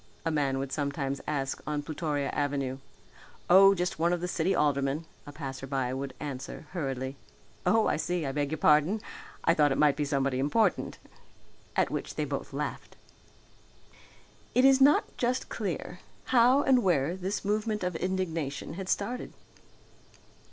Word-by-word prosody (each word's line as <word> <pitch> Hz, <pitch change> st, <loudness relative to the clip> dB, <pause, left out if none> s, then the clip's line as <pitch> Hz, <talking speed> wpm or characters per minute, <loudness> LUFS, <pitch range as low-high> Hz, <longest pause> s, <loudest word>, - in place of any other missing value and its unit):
a 165 Hz, -, +1 dB
man 140 Hz, -3 st, +1 dB
would 135 Hz, 0 st, -3 dB
sometimes 140 Hz, -1 st, -2 dB
ask 135 Hz, -3 st, -2 dB
on 150 Hz, -1 st, -2 dB
Plutoria 150 Hz, -2 st, -2 dB
Avenue. 140 Hz, -2 st, -1 dB, 0.7 s
"Oh 195 Hz, +2 st, +8 dB
just 180 Hz, -2 st, -2 dB
one 170 Hz, +1 st, +3 dB
of 175 Hz, -, 0 dB
the 180 Hz, -, -3 dB
city 180 Hz, +2 st, 0 dB
aldermen," 145 Hz, +1 st, +1 dB, 0.2 s
a -, -, -7 dB
passerby 135 Hz, -3 st, -3 dB
would 135 Hz, 0 st, -5 dB
answer 145 Hz, +1 st, -6 dB
hurriedly. 135 Hz, -5 st, -3 dB, 0.5 s
"Oh 220 Hz, -1 st, +4 dB
I -, -, +1 dB
see, 175 Hz, 0 st, -1 dB
I 135 Hz, -, -1 dB
beg 145 Hz, 0 st, -1 dB
your 160 Hz, -, -2 dB
pardon, 155 Hz, +7 st, +4 dB, 0.4 s
I 165 Hz, -, +4 dB
thought 150 Hz, -3 st, +3 dB
it 135 Hz, -, 0 dB
might 150 Hz, -2 st, +4 dB
be 150 Hz, -, -1 dB
somebody 140 Hz, -2 st, 0 dB
important." 150 Hz, +12 st, +1 dB, 0.8 s
At -, -, +2 dB
which -, -, -4 dB
both -, -, -3 dB
laughed. -, -, -5 dB, 1.6 s
It 255 Hz, -, +5 dB
was 270 Hz, 0 st, +6 dB
not 285 Hz, +2 st, +4 dB
just 250 Hz, +1 st, -1 dB
clear 180 Hz, -3 st, -4 dB, 0.3 s
how 250 Hz, +3 st, +6 dB
and 260 Hz, -2 st, +4 dB
where 170 Hz, -, +1 dB
this 190 Hz, +2 st, -3 dB
movement 210 Hz, 0 st, 0 dB
of 180 Hz, -1 st, -2 dB
indignation 165 Hz, -6 st, -2 dB
had 185 Hz, +2 st, -6 dB
started. 240 Hz, +5 st, -2 dB
155 Hz, 150 wpm, -29 LUFS, 140-190 Hz, 1.6 s, Oh